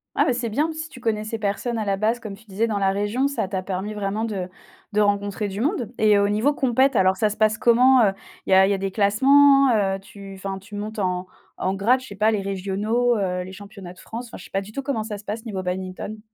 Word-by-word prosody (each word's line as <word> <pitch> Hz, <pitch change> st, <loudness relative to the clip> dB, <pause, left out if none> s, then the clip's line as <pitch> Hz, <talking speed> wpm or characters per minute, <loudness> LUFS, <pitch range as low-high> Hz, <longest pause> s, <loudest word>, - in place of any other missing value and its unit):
Ah, -, -, +3 dB
bah, 255 Hz, -, +2 dB
c'est 240 Hz, -1 st, -2 dB
bien, 300 Hz, +9 st, 0 dB
si 315 Hz, 0 st, -6 dB
tu -, -, -12 dB
connaissais 220 Hz, -1 st, -2 dB
personne 220 Hz, +3 st, -2 dB
à 215 Hz, -, -2 dB
la 200 Hz, -1 st, +1 dB
base 220 Hz, +4 st, 0 dB
comme 215 Hz, -3 st, -7 dB
tu 220 Hz, +3 st, -20 dB
disais 210 Hz, +2 st, -1 dB
dans 210 Hz, -3 st, -1 dB
la 195 Hz, -1 st, +2 dB
région. 205 Hz, +7 st, 0 dB
Ça 280 Hz, -8 st, -2 dB
t'a 190 Hz, 0 st, -3 dB
permis 190 Hz, +2 st, -4 dB
vraiment 210 Hz, +1 st, -2 dB
de 195 Hz, -5 st, -4 dB, 0.4 s
de 210 Hz, 0 st, +2 dB
rencontrer 205 Hz, 0 st, 0 dB
du 200 Hz, +2 st, -5 dB
monde. 260 Hz, -, -1 dB
Et 215 Hz, -1 st, +5 dB
au 200 Hz, 0 st, +3 dB
niveau 215 Hz, +8 st, +2 dB
compète 265 Hz, -1 st, +2 dB
alors 190 Hz, -2 st, +4 dB
ça 215 Hz, +2 st, +1 dB
se 210 Hz, -, -6 dB
passe 215 Hz, +1 st, +2 dB
comment, 250 Hz, +2 st, +5 dB
heu? 195 Hz, -2 st, +3 dB, 0.3 s
Il -, -, -5 dB
y -, -, +4 dB
a 190 Hz, 0 st, +7 dB
il 195 Hz, -, +1 dB
y -, -, +3 dB
a -, -, 0 dB
des 195 Hz, 0 st, -2 dB
classements, 275 Hz, +7 st, +5 dB
heu? 195 Hz, -2 st, +1 dB
Tu 195 Hz, 0 st, -11 dB
enfin 195 Hz, 0 st, -5 dB
tu 200 Hz, +3 st, -15 dB
montes 215 Hz, +2 st, -5 dB
en 185 Hz, -2 st, -1 dB, 0.3 s
en 190 Hz, -, -1 dB
grade 230 Hz, +7 st, +3 dB
je 260 Hz, -, -11 dB
sais 200 Hz, -, -9 dB
pas 215 Hz, +3 st, +3 dB
les 210 Hz, -2 st, 0 dB
régionaux, 200 Hz, +5 st, 0 dB
heu, 180 Hz, -2 st, -1 dB
les 185 Hz, -, -9 dB
championnats 200 Hz, -2 st, -10 dB
de 180 Hz, -, -19 dB
France? 235 Hz, +2 st, -7 dB
Enfin, -, -, -9 dB
je -, -, -12 dB
sais -, -, -14 dB
pas 195 Hz, -, -1 dB
du 200 Hz, +2 st, -11 dB
tout 275 Hz, -, -4 dB
comment 265 Hz, -5 st, -2 dB
ça 210 Hz, -1 st, -6 dB
se -, -, -13 dB
passe 220 Hz, +3 st, -5 dB
niveau 200 Hz, -4 st, -4 dB
badminton. 185 Hz, +3 st, -5 dB
210 Hz, 270 wpm, -23 LUFS, 195-230 Hz, 0.4 s, a